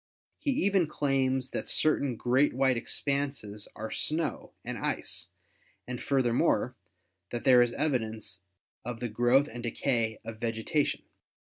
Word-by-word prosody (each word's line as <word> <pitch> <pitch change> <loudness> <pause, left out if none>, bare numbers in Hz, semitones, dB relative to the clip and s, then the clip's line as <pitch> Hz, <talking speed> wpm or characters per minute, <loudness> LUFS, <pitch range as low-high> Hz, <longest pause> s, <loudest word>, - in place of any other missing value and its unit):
He - - -2 0.2
even 195 -4 +3
claims 135 -3 0
that - - -3
certain 140 -5 +2
great 125 +4 +2
white 130 -1 +3
expanses 135 -4 -2
are 110 +1 -5
snow 155 -1 -1
and - - -3
ice, - - -2 0.6
and, 125 -1 -5
furthermore, 125 -2 +2 0.5
that 120 - -4
there 125 -3 +7
is 120 -1 +2
evidence 110 -9 -2 0.4
of 120 0 -5
the 120 -1 -3
growth 120 +6 +3
and 120 +1 -7
decay 115 -2 0
of 110 -1 -7
vegetation. 115 +6 -1
125 Hz, 130 wpm, -29 LUFS, 115-140 Hz, 0.6 s, there